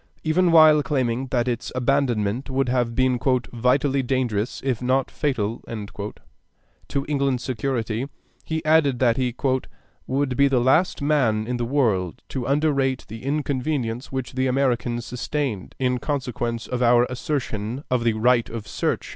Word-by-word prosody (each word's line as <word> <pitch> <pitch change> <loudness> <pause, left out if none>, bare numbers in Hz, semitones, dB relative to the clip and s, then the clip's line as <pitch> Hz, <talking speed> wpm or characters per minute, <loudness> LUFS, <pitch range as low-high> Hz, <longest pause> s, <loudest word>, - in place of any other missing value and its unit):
Even 170 +3 +3
while 155 -2 +7
claiming 130 -3 -1
that 125 -1 0
its 120 -1 -2
abandonment 125 -3 0
would 135 -1 0
have 120 -2 0
been 130 -1 +2 0.3
"vitally 130 +3 +2
dangerous 120 -4 -1
if 125 -4 0
not 130 +1 +1
fatal" 115 -7 -1 1.3
to 140 0 -2
England's 140 -4 0
security, 120 0 -2 0.3
he 160 0 -3
added 155 -4 +4
that 120 -2 +2
he 125 -2 -1 0.7
"would 135 -1 0
be 140 +2 +4
the 135 -2 +2
last 140 +6 +2
man 125 -8 +2
in 125 +1 -2
the 120 - -2
world 110 - 0
to 130 -3 -3
underrate 140 -2 +1
the 110 +2 -8
inconvenience 135 -3 -2
which 130 -2 -4
the 130 +1 0
Americans 125 -3 0
sustained 125 -5 -3
in 125 -1 0
consequence 120 -4 -3
of 125 0 -3
our 120 0 +5
assertion 125 -2 -3
of 125 -2 +2
the 115 -1 +2
right 120 +2 +2
of 110 -2 -6
search." - - -2
130 Hz, 145 wpm, -23 LUFS, 120-140 Hz, 1.3 s, while